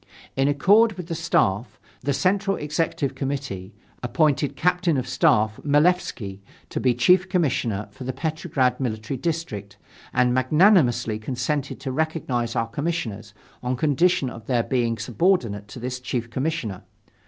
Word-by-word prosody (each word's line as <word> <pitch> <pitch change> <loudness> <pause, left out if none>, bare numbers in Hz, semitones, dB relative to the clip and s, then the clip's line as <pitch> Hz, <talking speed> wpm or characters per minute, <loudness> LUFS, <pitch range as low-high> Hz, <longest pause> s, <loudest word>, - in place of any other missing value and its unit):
In 135 +1 +2
accord 205 +10 +4
with 180 -2 -8
the - - -1
Staff, 125 - 0 0.2
the 140 - -1
Central 195 +6 +1
Executive 150 -2 -1
Committee 135 -9 -4 0.3
appointed 145 +1 +1
Captain 180 +1 +2
of 130 -1 -2
Staff 110 -4 +2
Malefski 145 - +1 0.3
to - - -2
be 125 -2 +2
Chief 180 +9 +4
Commissioner 130 - 0
for 130 - -10
the 130 - -2
Petrograd 150 -4 -1
Military 110 -1 -3
District 130 - -4 0.3
and 125 -1 +2
magnanimously 130 - +3
consented 130 +5 -2
to 135 - -3
recognize 130 -6 -1
our 115 - 0
commissioners, 115 -7 -4 0.3
on 125 +1 -1
condition 145 +1 +2
of 115 -2 -11
their 120 -3 +2
being 120 -3 0
subordinate 115 - 0
to 115 - -9
the 125 +2 -4
Chief 125 -2 -4
Commissioner. 130 - -2
130 Hz, 140 wpm, -24 LUFS, 120-160 Hz, 0.3 s, accord